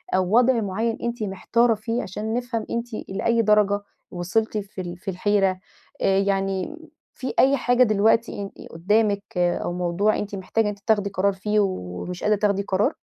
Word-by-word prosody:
أو 185 +3 +2
وضع 245 -2 +4
معيَّن 220 +4 -1
أنتِ 235 -1 -2
محتارة 225 +4 +2
فيه، 230 +3 -3
عشان 215 +4 -4
نفهم 240 -2 -2
أنتِ 235 +1 -2 0.2
لأي 230 +4 +1
درجة 205 -1 +3 0.3
وصِلتِ 205 +5 -1
في 195 -2 -5
ال 175 0 -6
في 195 +2 -5
الحيرة. 195 0 +1 0.4
آآ، 195 0 +3
يعني 195 +5 -1 0.4
في 260 - -5
أي 275 +1 +5
حاجة 245 0 +3
دلوقتي 215 0 +2
ان 200 - -8
قدامِك 200 +4 +1
أو 175 0 0
موضوع 180 +4 +1
أنتِ 205 0 -4
محتاجة 195 +4 0
إن - - +1
أنتِ 205 -1 -6
تاخدي 205 -2 +2
قرار 195 +1 +1
فيه 210 +2 0
ومش 175 - -4
قادرة 210 -1 +3
تاخدي 200 -1 +1
قرار؟ 195 +1 +1
205 Hz, 170 wpm, -24 LUFS, 190-225 Hz, 0.4 s, أي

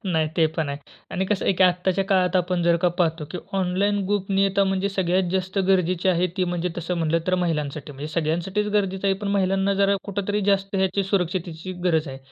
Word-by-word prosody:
नाही 160 -3 +1
ते 160 -2 +5
पण 155 -3 -1
आहे 140 0 -4 0.3
आणि 190 +1 -1
कसं 210 -1 -1
आहे - - +3
की 185 - +2
आत्ताच्या 180 +1 +1
काळात 185 -2 +2
आपण 180 -1 0
जर 170 0 +4
का 180 - +5
पाहतो 165 -2 +1
की 180 - -5 0.2
ऑनलाईन 195 +3 +1
गोपनियता 195 0 +1
म्हणजे 195 +1 0
सगळ्यात 185 -2 0
जास्त 185 +1 -1
गरजेची 185 -1 +2
आहे, 180 0 +3
ती 185 - +1
म्हणजे 175 0 -2
तसं 175 +1 -2
म्हटलं 165 0 +1
तर 185 - +2
महिलांसाठी. 150 -4 -2
म्हणजे 145 +3 -7
सगळ्यांसाठीच 175 +6 -1
गरजेचं 195 -1 0
आहे, 195 - +3
पण 205 0 -4
महिलांना 195 0 +1
जरा 200 0 +3
कुठेतरी 205 +1 -2
जास्त 195 0 +1
ह्याची 190 +1 +1
सुरक्षिततेची 180 -2 -2
गरज 160 -4 +2
आहे. 135 0 -7
185 Hz, 200 wpm, -23 LUFS, 170-195 Hz, 0.3 s, ते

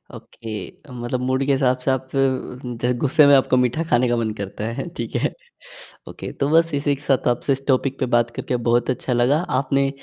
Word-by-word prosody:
Okay, 115 +5 -9
मतलब 120 0 -3
mood 130 +1 0
के 140 - +1
हिसाब 130 -2 +2
से 135 - +3
आप 130 0 -2 0.8
ज 125 - +2
गुस्से 150 +1 +4
में 140 - +7
आपको 130 -1 +3
मीठा 125 +5 +1
खाने 125 +1 +3
का 120 - +1
मन 115 -2 -1
करता 100 0 -6
है, 115 +9 -4
ठीक - - -5
है। - - 0 0.7
ओके। - - -7
तो 140 +1 -1
बस 165 +1 +3
इसी 145 0 +1
के 140 - -16
साथ 135 - +2
आपसे 125 +3 +1
इस 135 - -5
टॉपिक 135 0 +1
पे 130 - +1
बात 120 0 +3
करके 125 - -2
बहुत 120 +2 +2
अच्छा 130 0 -1
लगा। 125 +5 +3 0.2
आपने 135 0 +1
130 Hz, 210 wpm, -21 LUFS, 120-140 Hz, 0.8 s, में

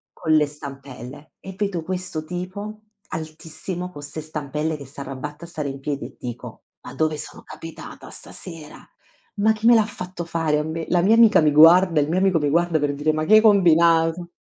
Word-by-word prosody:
con 160 -3 -1
le 150 -1 +4
stampelle? 140 -1 -10
E 190 0 -9
vedo 195 -5 -2
questo 180 -2 -4
tipo 185 +5 -6 0.3
altissimo 160 +3 -6
con 145 -5 -11
ste 145 +2 -6
stampelle 155 0 -3
che 140 - -11
s'arrabatta 140 +3 -7
a 170 - -10
stare 150 -4 -4
in 135 0 -6
piedi 140 0 -3
e - - -15
dico: 120 -1 -8 0.2
"Ma - - -10
dove 155 -1 0
sono - - -9
capitata 165 0 -10
stasera? 165 -5 -9 0.6
Ma 215 +2 +3
chi 220 +1 -3
me 240 - +8
l'ha 220 -2 +5
fatto 180 -4 -7
fare 160 -2 0
a 150 - 0
me?". 160 +1 -4
La 175 - +3
mia 200 +6 +4
amica 225 -4 +6
mi 150 -1 +3
guarda, 165 +2 +7
il 145 - 0
mio 175 +4 0
amico 190 -3 +3
mi 150 -2 0
guarda 170 +1 +2
per 145 -1 -1
dire: 150 +2 0
"Ma 155 0 -1
che 215 - +4
hai 215 - +9
combinato?". 170 -4 +4
160 Hz, 200 wpm, -22 LUFS, 150-180 Hz, 0.6 s, hai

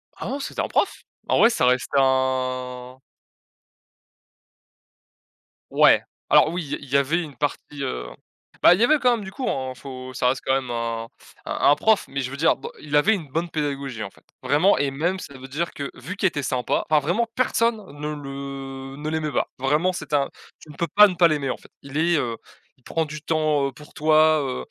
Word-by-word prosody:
Ah - - -7
non 280 - -3
c'était - - -4
un - - -1
prof. - - +1 0.4
En - - +2
vrai, 230 - +7
ça 130 - +1
reste 125 0 +2
un 130 -1 0 2.7
Ouais. - - +6 0.3
Alors 155 - +6
oui, 175 0 -3
il 140 - -10
y - - +1
a - - -7
il 140 - -12
y 140 - +3
avait 150 +6 +1
une 150 -4 -8
partie, 145 -1 -3
heu, - - -3 0.6
bah, 175 - +9
il 185 - 0
y - - +6
avait 300 +4 +4
quand 250 -1 +4
même 215 - -6
du 190 - -7
cours, 255 +5 -3
hein, 130 -1 -3
faut 130 0 -9
ça 125 -1 +1
reste 130 - -1
quand 135 - +2
même 130 -2 -1
un 115 -1 -3
f - - -19
un - - -3 0.2
un - - +6
prof, 215 +6 +2
mais 140 0 -3
je 130 +1 -4
veux 140 - -6
dire 160 +2 +3
dans - - -8
il 150 -1 -3
avait 195 +10 +5
une 175 -8 -4
bonne 165 +5 -2
pédagogie 140 -6 -3
en - - -5
fait. - - -24 0.2
Vraiment 165 +7 +4
et 140 -1 0
même 170 +7 -1
ça 140 - -9
veut 130 - -10
dire, 155 +6 -3
que 140 -1 -5
vu 190 - -7
qu'il 200 - +2
était 145 -6 -3
sympa 130 -1 -1
enfin 155 -1 +5
vraiment 220 +9 +1
personne 235 -2 +2 0.2
ne 150 +1 -3
le 135 -1 -7
ne 150 +1 -4
l'aimait 155 -1 -2
pas, - - 0
vraiment 150 +7 +2
c'était 150 -4 -3
un 140 -1 +1 0.3
tu - - -16
ne - - -13
peux 170 - 0
pas 210 0 +9
ne 185 - -4
pas 170 -1 +6
l'aimer 145 -4 -1
en - - -2
fait - - -19
il 140 +1 -6
est, 170 +2 +3
heu, 120 -5 -2 0.4
il 130 - -32
prend 165 +5 -1
du 150 0 -8
temps, 155 -3 +1
heu, 135 - -5
pour 150 0 -15
toi, 155 0 +4
heu. 130 -2 -4
145 Hz, 230 wpm, -23 LUFS, 130-165 Hz, 2.7 s, bah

